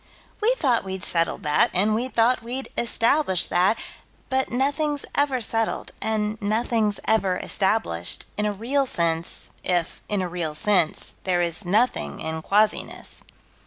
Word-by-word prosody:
We 470 +4 +3
thought 255 - +2
we'd 190 -1 -5
settled 165 -1 +1
that, 150 -1 +3
and 205 +4 +3
we 235 +4 0
thought 245 0 +2
we'd 250 +4 -5
establish 230 - +2
that, 185 +5 +2 0.5
but 265 0 0
nothing's 285 +3 0
ever 280 -3 +1
settled, 225 0 0
and 215 0 -1
nothing's 215 0 0
ever 195 -4 +2
established, 190 - 0
in 210 0 0
a - - 0
real 260 +7 0
sense, 170 -4 0
if, 175 -2 -1
in 205 -2 0
a - - -2
real 170 -3 -3
sense, 175 -1 +1
there 180 -2 +1
is 170 +3 0
nothing 220 +7 +1
in 160 0 -4
quasiness. 210 +5 0
210 Hz, 145 wpm, -24 LUFS, 180-245 Hz, 0.5 s, We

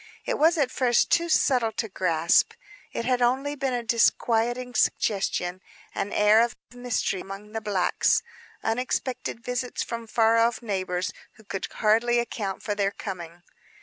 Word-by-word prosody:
It - - -1
was 325 +3 +4
at 275 -4 +1
first 245 -2 +2
too 340 0 +3
subtle 250 -8 +3
to 225 - -2
grasp. 170 -4 +2 0.4
It 230 - -4
had 250 0 +1
only 265 +4 +1
been 270 -3 -2
a 240 - -2
disquieting 235 +2 +1
suggestion; 185 -5 0 0.3
an 205 - -3
air 210 +2 +5
of 235 0 0 0.2
mystery 245 -6 -2
among 195 +2 -9
the 225 0 -4
blacks; 200 -4 +1 0.4
unexpected 250 +1 -2
visits 250 0 -2
from 230 -1 -6
far 225 +1 +3
off 230 +1 +2
neighbors 185 -4 -2 0.2
who 220 - -19
could 195 -2 -4
hardly 230 +3 +2
account 210 -5 -3
for 210 - -1
their 200 -1 +1
coming. 175 -4 -8
230 Hz, 150 wpm, -26 LUFS, 200-245 Hz, 0.4 s, air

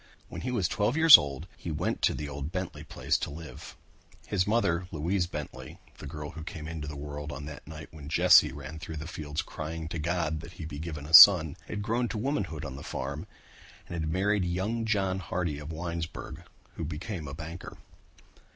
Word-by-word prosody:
When - - -7
he 125 - -3
was 110 -8 +1
twelve 110 - 0
years 160 -3 +11
old 70 +3 +1
he - - -7
went 75 - -2
to - - +3
the 75 - -4
old 70 +1 -5
Bentley 90 0 -4
place - - -1
to - - -3
live. 80 +2 -10 0.5
His 95 -2 0
mother, 90 -6 +1
Louise 85 +4 0
Bentley, 65 -5 -7 0.2
the 75 - -7
girl 75 +1 -6
who 80 -2 -8
came 80 -2 -7
into 80 -2 -5
the 75 - -6
world 75 +1 -6
on 70 +1 -6
that 75 -2 -9
night 80 0 -9
when 75 -2 -10
Jesse - - +6
ran 80 +1 -8
through 80 -1 -7
the 80 - -5
fields 75 -3 -4
crying 80 +1 -6
to 85 - -4
God 80 -1 -1
that 85 +2 -10
he 80 - -8
be 75 -2 -7
given 75 -3 -6
a 80 - -9
son, 80 -4 +10
had 105 -1 -4
grown 120 +3 0
to 110 - -4
womanhood 100 - -2
on 65 -1 -6
the - - -8
farm 70 +8 -5 0.6
and - - -8
had 80 -2 -2
married 100 +2 +1
young 95 +6 -1
John 95 -4 0
Hardy 85 -5 -2
of 75 +2 -7
Winesburg, 85 0 -5 0.3
who - - -3
became 80 +2 -5
a 70 - -6
banker. 80 +2 -8
80 Hz, 205 wpm, -29 LUFS, 75-95 Hz, 0.6 s, years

